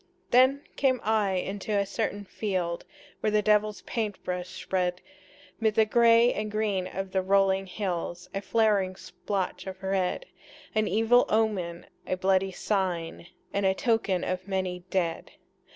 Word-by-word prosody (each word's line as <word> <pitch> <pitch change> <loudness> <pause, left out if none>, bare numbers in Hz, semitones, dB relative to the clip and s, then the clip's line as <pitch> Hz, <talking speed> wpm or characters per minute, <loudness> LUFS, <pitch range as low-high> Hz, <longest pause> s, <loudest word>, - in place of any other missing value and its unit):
Then 260 +3 +5
came 260 -2 +2
I 215 -2 +2
into 200 +3 -2
a 200 - +2
certain 205 +1 -3
field 185 -4 -2 0.3
Where - - +1
the 210 0 +2
devil's 210 -2 +2
paint 215 -4 -3
brush 180 0 -3
spread 180 -1 0 0.6
'Mid 220 -2 +1
the 220 - +5
gray 235 +2 +5
and 210 0 -3
green 210 -3 -1
of 195 0 -5
the 190 - +1
rolling 195 0 +2
hills 180 -2 -4
A 195 - -2
flaring 205 -4 +2
splotch 190 0 -4
of 190 0 -8
red, 190 - 0 0.5
An 215 -1 +1
evil 225 +3 +4
omen, 200 -6 0 0.2
a 185 - -1
bloody 190 +1 +2
sign, 180 -4 -2 0.3
And 200 - 0
a 190 0 +3
token 210 -5 +1
of 185 +1 -3
many 185 -2 -2
dead. 170 -3 -1
195 Hz, 150 wpm, -28 LUFS, 185-215 Hz, 0.6 s, Then